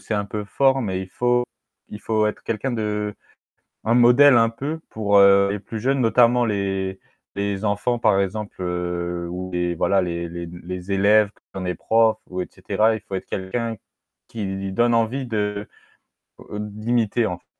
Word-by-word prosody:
c'est 110 - -4
un 100 0 0
peu 105 0 -4
fort, 135 +6 +2
mais 95 -6 -2
il 95 - -7
faut 120 +4 +1 0.5
il 105 - -9
faut 110 +1 +1
être - - -6
quelqu'un 115 +4 -2
de 105 -2 -2 0.7
un 115 - +2
modèle 125 +3 +7
un 115 0 +4
peu 145 +7 -5
pour, 100 -2 +1
heu, 100 0 +6
les 100 - -3
plus 110 +2 -7
jeunes 135 +3 +1
notamment 120 +1 +4
les 95 -2 -2 0.4
les 100 0 -2
enfants 110 +4 0
par 105 -4 +3
exemple, 100 0 -3
heu, 90 -1 -3
ou 90 +1 -5
les 90 0 0
voilà 95 +3 +2
les 85 -1 -3
les 85 0 -6
les 90 +2 -7
élèves 100 +2 +4
qui - - -32 0.2
ont - - -4
des 90 -1 -2
profs 110 +4 +2
ou 90 0 -3
et - - -5
cetera, 110 +1 +1
il 110 - -7
faut 95 - -4
être - - -4
quelqu'un 115 +4 -3 0.5
qui 95 -3 -4
donne 120 +3 +3
envie 115 +4 0
de 105 -3 -2 0.9
heu, 105 - -5
d'imiter 110 +2 0
en 90 -1 -3
f - - -36
105 Hz, 185 wpm, -22 LUFS, 95-115 Hz, 0.9 s, modèle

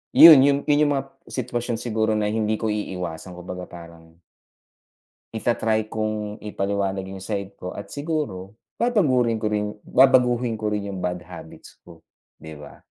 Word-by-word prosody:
'yon 160 -5 +11
yong 140 +1 +4
'yon 145 0 +3
yong 145 - +1
mga 135 - -3 0.2
situwasyon 120 -2 -3
siguro 110 -2 -1
na 105 - 0
hindi 110 -1 0
ko 110 - -4
iiwasan. 90 -3 -5
Kumbaga 90 0 -8
parang 85 -1 -13 1.2
ita-try 110 -1 0
kong 110 -1 -4
ipaliwanag 100 -2 -2
yung 95 - -7
side 100 0 -5
ko. 90 0 -7
At 100 - -9
siguro, 145 - -4 0.2
babagurin 130 - +2
ko 110 - 0
rin 105 0 -2
babaguhin 125 -2 +3
ko 110 -1 -2
rin 100 -1 -3
yung 95 - -6
bad 90 0 -3
habits 85 -2 -13
ko, 85 -2 -17 0.3
'di 80 0 -10
ba? 75 - -13
105 Hz, 155 wpm, -23 LUFS, 95-120 Hz, 1.2 s, yon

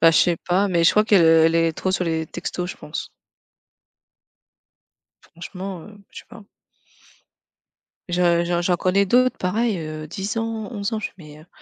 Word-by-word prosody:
Ben, 165 0 +7
je - - +3
sais 175 -2 +3
pas, 190 +3 +2
mais 170 -2 +1
je - - +7
crois 210 0 +3
qu'elle, 200 -5 +4
heu, 160 0 +6
elle 165 0 +3
est 165 -1 +2
trop 185 - -2
sur 180 - 0
les 160 -1 -2
textos 180 +3 -5
je - - -10
pense. 150 - -7 2.1
Franchement, 180 +1 -8
heu, 210 -1 -14
je - - -10
sais - - -21
pas. 230 -3 -13 1.7
Je 175 -1 +2
je 175 0 0
j'en 175 0 +1
connais 190 +3 +1
d'autres 255 +5 +2
pareil, 210 +2 0
heu, 155 -1 -6
10 195 +6 -5
ans, 225 -1 -3
11 205 0 -4
ans, 220 - -1
je - - -3
mais, 150 -4 -13
heu. 155 - -17
180 Hz, 185 wpm, -22 LUFS, 165-205 Hz, 2.1 s, Ben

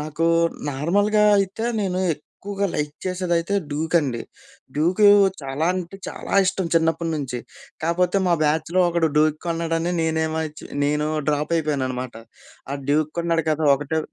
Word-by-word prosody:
నాకు 155 +2 -2 0.4
నార్మల్‌గా 205 +9 +2
అయితే, 195 +4 -1 0.2
నేను 185 -2 -1 0.2
ఎక్కువగా 200 +6 -5
లైక్ 150 0 -2
చేసేదైతే 180 0 -1 0.2
డ్యూక్ 160 +3 -3
అండి. 130 -6 -3 0.6
డ్యూకూ, 180 +7 +3 0.4
చాలా 135 +4 -2
అంటే 185 +1 -5
చాలా - - -7
ఇష్టం 190 -1 0
చిన్నప్పటి 165 0 +1
నుంచి. 130 -4 -4 0.5
కాపోతే 180 +3 +1
మా 175 - +4
బ్యాచ్‌లో 160 +4 +1
ఒకడు 170 -2 +1
డ్యూక్ 155 0 +3
కొన్నాడని 165 +1 -1
నేనేమోచ్చి 160 -1 -2 0.2
నేను 150 +1 +1 0.2
డ్రాప్ 150 +2 0
అయిపోయాను 145 -4 -1
అనమాట. 125 -1 -5 0.6
ఆడు 140 -1 -5
డ్యూక్ 155 +1 +2
కొన్నాడు 165 -1 +1
కదా 155 0 0
ఒకటే 145 +3 -2
160 Hz, 135 wpm, -23 LUFS, 150-175 Hz, 0.6 s, మా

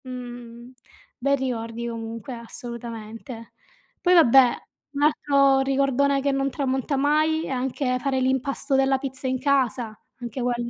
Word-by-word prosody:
Mh, 245 -1 -9 0.5
bei 280 +2 +2
ricordi 235 -3 -4
comunque 230 +1 -6
assolutamente. 230 0 -8 0.5
Poi 360 - +4
vabbè 265 -6 +6 0.4
un 285 - -3
altro 275 -2 +3
ricordone 275 +1 +2
che 280 +1 +1
non 275 0 0
tramonta 270 0 -1
mai 310 +3 +2
è - - -6
anche 255 0 -1
fare 270 0 0
l'impasto 265 +2 0
della 270 0 +3
pizza 265 -1 -5
in 260 0 -1
casa, 250 -5 0 0.2
anche 240 +1 -5
quello. 240 -1 -1
260 Hz, 135 wpm, -24 LUFS, 240-275 Hz, 0.5 s, vabbè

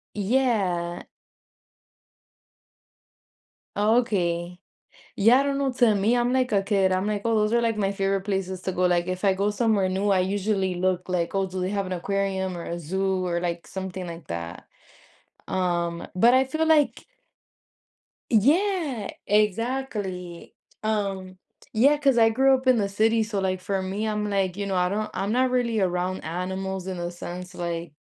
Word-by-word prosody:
Yeah. 195 -6 0 2.7
Okay. 180 -6 +1 0.6
Yeah, 230 +6 +5
I - - +2
don't 280 0 -1
know, 270 -2 0
to 240 -4 +3
me, 215 +5 +2
I'm 240 +1 +1
like 255 -1 +1
a 200 -1 +3
kid, 195 -2 +2
I'm 185 +2 0
like, 210 -1 -1
oh, 225 -1 +2
those 210 +1 +1
are 235 0 +3
like 225 -2 0
my 200 -1 0
favorite 195 -1 0
places 190 -2 -3
to 185 - -2
go. 180 0 +1
Like, 175 0 +1
if 185 +2 -4
I 195 - +5
go 200 +2 0
somewhere 210 -3 +1
new, 195 +2 0
I 190 - +4
usually 195 0 0
look 180 0 -1
like, 180 0 -1
"Oh, 195 0 +1
do 185 0 -5
they 185 +1 -1
have 200 -2 -1
an 185 - -5
aquarium 190 0 -2
or 170 - -6
a 170 - -4
zoo," 190 +3 -1
or 175 -1 -1
like 170 -1 -3
something 190 -1 -6
like 165 -1 -8
that. 85 0 -6 0.8
Um, 175 -2 -1
but 230 +7 +5
I 260 +1 +5
feel 315 +4 -1
like 305 -3 +2 1.3
Yeah, 290 - +2 0.2
exactly, 210 -4 -1 0.3
um, 195 -4 -2 0.4
Yeah, 280 +7 +5
'cause 275 -4 +2
I 225 0 +6
grew 265 +4 +4
up 260 0 0
in 255 -2 +5
the 200 -2 +1
city. 220 +3 +2
So, 210 -2 -3
like, 185 -1 -1
for 190 +1 -2
me, 200 +4 -3
I'm 210 -1 -1
like, 190 -2 0
you 200 -1 -3
know, 195 - -1
I 180 0 +2
don't 215 +2 -2
I'm 200 +2 -2
not 255 +2 +2
really 235 -3 +1
around 180 0 -1
animals 190 +3 -4
in 185 -2 -4
a 175 0 -3
sense, 180 +1 -8
like, 170 -2 -4
195 Hz, 175 wpm, -25 LUFS, 180-220 Hz, 2.7 s, I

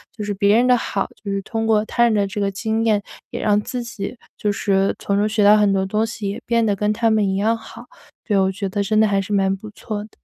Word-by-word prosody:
就 215 - -5
是 205 0 -2
别 200 +1 +3
人 245 +2 +3
的 250 - +6
好， 200 -4 -2 0.2
就 200 - -4
是 195 0 -1
通 225 +2 -3
过 215 -1 +3
他 235 - +1
人 235 -1 +4
的 200 -2 +1
这 195 +2 -5
个 200 0 0
经 220 +3 -1
验， 215 -2 +2 0.3
也 - - -4
让 205 -1 +3
自 250 +3 -4
己 235 0 -6 0.2
就 210 - 0
是 195 -1 +1
从 200 - -1
中 205 +1 +2
学 215 -1 +1
到 205 +1 +7
很 205 -1 +3
多 190 -1 +1
东 210 +3 0
西， 220 -3 -5
也 200 - -6
变 235 0 +2
得 210 -2 +1
跟 210 +1 0
他 230 +1 +1
们 215 -2 +2
一 190 0 0
样 225 +3 +1
好。 225 +1 -12 0.4
对， 205 -3 +1
我 190 0 +2
觉 195 0 -4
得 200 +1 -1
真 215 +2 +1
的 220 - +5
还 200 -1 +1
是 205 +2 -5
蛮 195 -1 +2
不 215 +2 -10
错 210 0 -6
的。 215 - -13
210 Hz, 305 characters per minute, -21 LUFS, 200-225 Hz, 0.4 s, 到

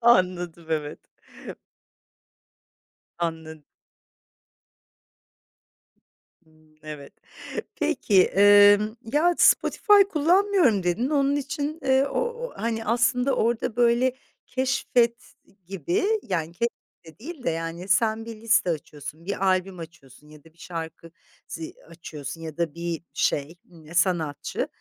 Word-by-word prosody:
Anladım, 180 -7 +2
evet. 150 -2 -2 2.2
Anla 160 -2 -4 2.9
Imm, 155 -1 -26
evet. 150 -2 -9 0.6
Peki, 190 -4 +3
emm, 205 +2 +5 0.2
ya, 345 +4 +3
Spotify 415 -2 +5
kullanmıyorum, 340 - +3
dedin 180 +9 0
onun 280 -1 +2
için, 290 +2 -3
eee, 265 +1 +3
o - - -2
o, 480 +1 -4
hani, 225 -1 -3
aslında 250 +3 +1
orada 230 0 0
böyle 245 +1 +2 0.3
keşfet 250 -2 0 0.3
gibi 175 - -2 0.2
yani 170 -6 -3
ke 235 +6 0 0.4
de 160 0 -15
değil 290 +1 -9
de, - - +1
yani, 165 +3 -4
sen 220 +4 +1
bir 230 -1 -7
liste 230 -5 +2
açıyorsun, 155 -1 -6
bir 195 0 -2
albüm 185 -1 0
açıyorsun 150 -3 -13
ya 150 -1 -16
da 160 -1 -20
bir - - -33
şarkı 165 -1 -8 0.4
zi 165 -1 -7
açıyorsun 165 -1 -8
ya 160 -2 -8
da 170 -3 -2
bir 170 -1 -4
şey, 145 +4 -1 0.2
ımm, 165 -1 -13
sanatçı. 165 -6 0
185 Hz, 115 wpm, -25 LUFS, 165-245 Hz, 2.9 s, emm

